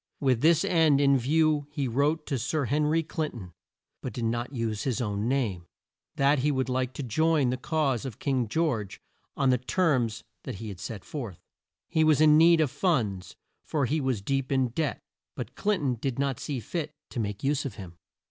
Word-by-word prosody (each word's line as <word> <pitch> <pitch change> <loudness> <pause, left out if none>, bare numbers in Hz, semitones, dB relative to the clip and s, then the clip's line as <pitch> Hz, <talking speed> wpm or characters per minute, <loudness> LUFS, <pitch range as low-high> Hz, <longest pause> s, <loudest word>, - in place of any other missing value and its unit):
With 130 -4 +2
this 165 +1 +4
end 160 -5 +4
in 140 -1 +4
view 150 +3 +2
he 140 -2 -2
wrote 145 +6 +1
to 135 -4 -2
Sir 140 +5 -1
Hen 150 +4 +1
ry 165 +2 +2
Clin 155 -1 -3
ton 95 -7 -9 0.5
but - - -5
did 120 - -3
not 120 +3 -1
use 115 -5 -2
his 130 -2 -1
own 105 -2 -1
name 110 -10 -1 0.5
that 140 +1 +3
he 145 +4 +1
would 130 -1 -1
like 130 0 -1
to 140 - -5
join 150 +1 +2
the 130 - -1
cause 140 -4 0
of 125 -5 -6
King 130 -4 0
George 115 - -1 0.4
on 135 -2 +3
the 125 - +2
terms 125 - 0 0.2
that - - -6
he 105 +1 -6
set 100 +3 -7
forth. 130 - -6 0.5
He 160 - +2
was 155 -2 +4
in 155 -1 +6
need 165 +1 +6
of 145 -5 +1
funds 105 - -1 0.3
for 145 -4 0
he 150 +5 0
was 130 -7 -1
deep 135 +3 -1
in 130 -2 +2
debt, 150 +5 -2 0.3
but 125 -1 -6
Clin 210 +7 0
ton 135 -4 0
did 135 -3 -2
not 135 -3 -1
see 140 -4 -3
fit 155 +4 -4 0.2
to - - -4
make 105 -2 -3
use 145 +1 +1
of 140 - -5
him. 90 -5 -10
135 Hz, 205 wpm, -28 LUFS, 115-150 Hz, 0.5 s, in